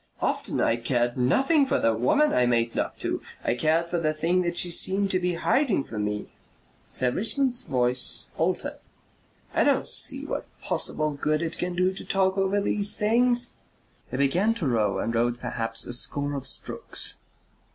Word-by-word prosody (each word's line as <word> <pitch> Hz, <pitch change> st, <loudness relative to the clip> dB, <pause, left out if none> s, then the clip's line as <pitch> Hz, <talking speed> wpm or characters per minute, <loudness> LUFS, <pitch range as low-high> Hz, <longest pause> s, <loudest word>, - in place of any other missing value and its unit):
Often -, -, -1 dB
I 115 Hz, -, +2 dB
cared 120 Hz, 0 st, 0 dB
nothing 270 Hz, -, +2 dB
for -, -, +1 dB
the 115 Hz, -, +2 dB
woman 130 Hz, -, +2 dB
I 125 Hz, -1 st, +3 dB
made 115 Hz, -1 st, +1 dB
love -, -, -2 dB
to. -, -, -2 dB, 0.2 s
I -, -, +1 dB
cared 160 Hz, +7 st, +1 dB
for 175 Hz, 0 st, -2 dB
the 155 Hz, -1 st, 0 dB
thing 170 Hz, +3 st, +1 dB
she 175 Hz, 0 st, +3 dB
seemed 195 Hz, +3 st, +3 dB
to 185 Hz, -, +1 dB
be 180 Hz, -1 st, -1 dB
hiding 235 Hz, -, +1 dB
from 105 Hz, -4 st, -4 dB
me...." 105 Hz, 0 st, -4 dB, 0.6 s
Sir 125 Hz, -1 st, +2 dB
Richmond's 245 Hz, -, 0 dB
voice 125 Hz, -1 st, +2 dB
altered. -, -, -2 dB, 0.7 s
"I -, -, +3 dB
don't -, -, +2 dB
see -, -, +2 dB
what -, -, -4 dB
possible 155 Hz, 0 st, 0 dB
good 150 Hz, +2 st, -1 dB
it 165 Hz, 0 st, -3 dB
can 180 Hz, 0 st, -2 dB
do 185 Hz, +1 st, +1 dB
to -, -, -8 dB
talk 190 Hz, -1 st, +1 dB
over 195 Hz, +1 st, +1 dB
these 205 Hz, +1 st, +1 dB
things." 240 Hz, +3 st, +2 dB, 0.5 s
He 130 Hz, -, -4 dB
began 180 Hz, +12 st, +2 dB
to 170 Hz, -10 st, -2 dB
row 110 Hz, -5 st, +1 dB
and 115 Hz, -, -2 dB
rowed 120 Hz, +1 st, 0 dB
perhaps 115 Hz, -1 st, -2 dB
a -, -, -6 dB
score 145 Hz, +3 st, -2 dB
of 140 Hz, -2 st, -5 dB
strokes. -, -, -4 dB
160 Hz, 175 wpm, -26 LUFS, 125-195 Hz, 0.7 s, I